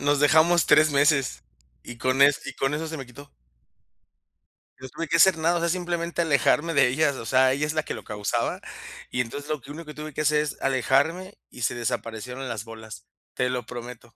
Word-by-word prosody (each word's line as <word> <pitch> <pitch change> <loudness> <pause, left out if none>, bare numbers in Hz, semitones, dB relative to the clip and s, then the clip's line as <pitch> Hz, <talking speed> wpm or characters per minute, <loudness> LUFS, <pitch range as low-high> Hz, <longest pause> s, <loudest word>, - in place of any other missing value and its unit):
nos 145 0 +1
dejamos 160 +2 +4
3 155 +1 +5
meses, 140 -1 +2 0.4
y 120 - -9
con 130 +2 +2
es 140 0 +4
y - - -6
con 135 +2 -1
eso 160 +2 -3
se 160 - -5
me 135 -3 -7
quitó. 140 - -14 1.5
No 130 0 -9
tuve 165 +6 -5
que 165 +2 +2
hacer 185 0 +6
nada, 170 +2 +1
o - - 0
sea, 170 0 0
simplemente 175 -1 -2
alejarme 155 +2 +2
de 140 -3 +5
ellas, 140 +2 +1
o 115 - -7
sea, 130 +1 +4
ella 145 +2 -1
es 150 - -2
la 155 -1 0
que - - -5
lo - - -8
causaba. 105 -2 -2 0.5
Y 125 - 0
entonces 145 +5 -6
lo 150 -4 -2
que 140 - -11
único 165 +2 -8
que 150 - -9
tuve 150 -1 -8
que 155 - -3
hacer 150 0 +3
es, 150 - -5
alejarme 145 +8 0
y 125 - -12
se 115 - 0
desaparecieron 120 +2 -4
las 110 -3 -4
bolas. 110 -1 -11 0.3
Te 125 0 0
lo 125 -3 -3
prometo. 120 -1 -10
140 Hz, 215 wpm, -25 LUFS, 125-155 Hz, 1.5 s, hacer